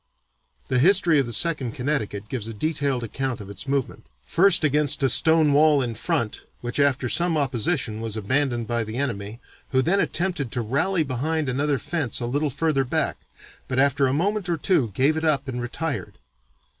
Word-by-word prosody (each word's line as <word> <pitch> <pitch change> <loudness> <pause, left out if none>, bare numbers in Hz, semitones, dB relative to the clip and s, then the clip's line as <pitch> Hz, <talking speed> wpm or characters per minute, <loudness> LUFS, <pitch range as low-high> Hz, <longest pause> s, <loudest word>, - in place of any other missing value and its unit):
The 130 -1 +1
history 175 0 +5
of 135 - 0
the - - -5
Second 130 -1 0
Connecticut 110 -7 -3
gives 115 -2 -4
a 115 - -7
detailed 140 -1 -1
account 130 +2 -3
of 100 -1 -9
its 100 +6 -7
movement, 135 -2 -2 0.2
first 185 -1 +4
against 150 -1 +1
a 135 - +4
stone 160 -2 +4
wall 150 0 +5
in 120 -2 -3
front 110 0 -2 0.2
which 120 +3 -3
after 140 -3 +2
some 170 +5 +2
opposition 125 -4 -1
was 110 -1 -4
abandoned 120 +2 0
by 120 0 -1
the 110 +2 -6
enemy, 115 -5 -4 0.3
who 130 0 +2
then 190 +7 +2
"attempted 175 - -1
to 120 - 0
rally 160 - 0
behind 150 +3 -2
another 140 +2 0
fence 145 -2 -2
a 120 - -3
little 145 +5 -1
further 145 0 0
back, 125 - -1 0.5
but 130 - -3
after 140 0 +3
a - - 0
moment 190 +6 -1
or 170 - 0
two 155 - +1
gave 140 +6 +3
it 160 - -3
up 145 -3 +1
and 125 -2 -4
'retired.' 125 - -4
140 Hz, 185 wpm, -24 LUFS, 120-155 Hz, 0.5 s, history